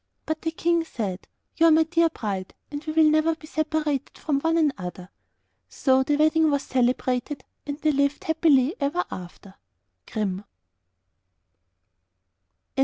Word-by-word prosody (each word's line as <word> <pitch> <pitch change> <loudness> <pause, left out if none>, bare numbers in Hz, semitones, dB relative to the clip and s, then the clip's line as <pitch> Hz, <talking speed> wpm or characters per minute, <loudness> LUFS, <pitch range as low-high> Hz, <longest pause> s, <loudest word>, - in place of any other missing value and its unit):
But 315 0 -3
the 325 - -1
King 335 +1 +1
said, 205 - -5 0.3
'You 330 - +6
are - - +6
my 320 +1 +6
dear 330 +1 +2
bride, 200 -10 -5 0.2
and 290 +1 -5
we 310 - -3
will 320 0 +5
never 310 +1 +3
be 315 - -14
separated 305 -2 -2
from 290 -3 -1
one 325 +1 +1
another.' 185 - -2 0.6
So 265 -1 +2
the 290 +2 +1
wedding 315 +1 +3
was 285 -1 0
celebrated 255 +2 0 0.2
and 285 0 -4
they 310 - +3
lived 280 0 0
happily 315 -3 +3
ever 300 +5 0
after. 185 +2 -9 0.6
Grimm. 200 -3 -2
295 Hz, 140 wpm, -25 LUFS, 255-320 Hz, 0.6 s, You